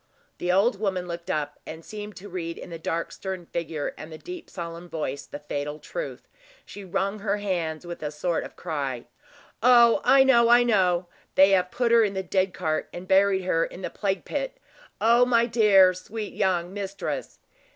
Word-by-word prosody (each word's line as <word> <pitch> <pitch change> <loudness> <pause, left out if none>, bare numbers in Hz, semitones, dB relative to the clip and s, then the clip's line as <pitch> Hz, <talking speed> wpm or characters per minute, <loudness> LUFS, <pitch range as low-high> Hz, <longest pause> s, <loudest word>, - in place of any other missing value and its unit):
The 175 - 0
old 195 +3 +3
woman 190 -4 -1
looked 170 0 -6
up, 145 -1 -2
and 160 +1 -9
seemed 210 -1 -8
to 200 - -10
read 170 -3 -5
in - - -9
the 165 - -6
dark, 165 +1 -2
stern 190 -2 -6
figure, 160 -3 -4
and 155 +2 -9
the 155 - -8
deep 360 - -9
solemn 170 0 -7
voice, 145 -4 -4
the - - -7
fatal 145 0 -4
truth. - - -7 0.4
She 205 - -10
wrung 195 +3 -2
her 205 0 -1
hands 175 -5 -2
with 175 0 -7
a 150 - -2
sort 160 +3 -2
of - - -10
cry. 140 -7 -4 0.6
"Oh! 240 +2 +6
I 270 0 +6
know, 235 -3 +5
I 240 +1 +7
know; 185 -6 +2 0.3
they 190 +1 +7
have 180 -2 +3
put 240 +2 0
her 230 -1 +6
in 200 -2 -1
the 190 - -2
dead 190 0 +1
cart, 160 -4 -2
and 180 +1 -8
buried 190 0 +4
her 165 -2 +1
in 185 - -7
the - - -3
plague 195 -2 -2
pit. - - -3 0.4
O 235 +2 +5
my 235 -2 +3
dear, 210 -5 +5
sweet 205 +4 -7
young 180 -2 0
mistress." 200 -1 -4
185 Hz, 195 wpm, -26 LUFS, 170-210 Hz, 0.6 s, I